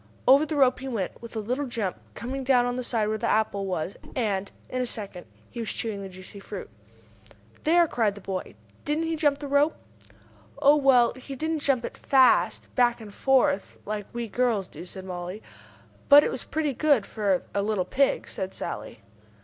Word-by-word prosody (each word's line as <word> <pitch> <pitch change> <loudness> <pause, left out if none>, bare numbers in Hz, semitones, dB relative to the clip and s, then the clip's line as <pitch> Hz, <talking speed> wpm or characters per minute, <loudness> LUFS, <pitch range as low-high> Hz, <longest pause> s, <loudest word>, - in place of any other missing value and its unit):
Over 275 +4 +6
the 310 - -3
rope 265 -3 +4
he 265 - -6
went, 220 -8 -3
with 235 0 -10
a - - -1
little 250 +7 -2
jump, 225 -7 -2 0.2
coming 265 +3 -4
down 250 -2 +4
on 245 0 -1
the 255 - -2
side 230 -3 0
where 215 0 -1
the - - 0
apple 200 -2 +1
was, 180 0 -3 0.2
and, 200 -5 -1 0.2
in 255 - -2
a - - 0
second 200 -6 -5 0.2
he 240 - -7
was 230 - -3
chewing 215 -4 -3
the 195 - -7
juicy 185 +2 -11
fruit. 195 - -8 0.9
"There!" 340 +2 +5
cried 220 -7 0
the 205 - -10
boy. 185 - -5 0.3
"Didn't 300 +2 0
he 325 0 -1
jump 295 -3 +2
the 290 0 -6
rope?" 285 +3 +3 0.8
"Oh, 285 +2 +6
well, 265 -5 +4
but 260 - -13
he 275 +1 -7
didn't 315 +3 -1
jump 270 -4 +1
it - - -8
fast, 265 -2 +3
back 245 -2 +3
and 210 -3 -10
forth, 260 -7 +2
like 210 -1 -4
we 235 -1 -4
girls 225 -4 0
do," - - -10
said 185 +1 -9
Mollie. 180 +2 -6 0.7
"But 290 0 +10
it - - 0
was - - -5
pretty 300 -2 -1
good 280 -6 +3
for 200 -4 0
a 200 - +1
little 205 -3 0
pig," 275 +1 +1
said 190 0 -5
Sallie. 105 +1 -6
235 Hz, 200 wpm, -26 LUFS, 200-275 Hz, 0.9 s, But